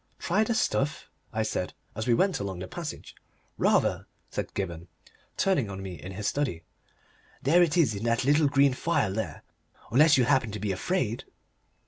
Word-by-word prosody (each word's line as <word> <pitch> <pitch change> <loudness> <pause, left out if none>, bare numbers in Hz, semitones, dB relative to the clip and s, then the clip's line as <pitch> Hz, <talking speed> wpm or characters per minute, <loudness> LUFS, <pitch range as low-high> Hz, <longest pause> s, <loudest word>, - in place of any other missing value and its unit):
"Try 200 +5 +1
the 225 +1 -1
stuff?" 150 - 0 0.2
I 110 -1 0
said, 90 -4 -3 0.2
as 110 +3 -4
we 120 - +4
went 185 +3 +2
along 100 -2 -4
the 90 +1 -6
passage. 170 - -7 0.4
"Rather," - - +2 0.2
said - - -4
Gibberne, 85 -3 -4 0.5
turning 175 - +2
on 95 0 -6
me 90 -5 -7
in 95 - -7
his 105 +2 -5
study. 130 - -1 0.8
"There 165 +7 +5
it 175 -1 +3
is 145 -10 +4
in 100 +1 -5
that 120 +2 +1
little 145 +2 +4
green 140 -1 +4
phial 125 - 0
there! 110 +2 -4 0.5
Unless 145 +5 +6
you 130 - +4
happen 130 -2 +2
to 105 - -4
be 105 -1 -1
afraid?" 120 - -1
120 Hz, 175 wpm, -28 LUFS, 100-150 Hz, 0.8 s, Unless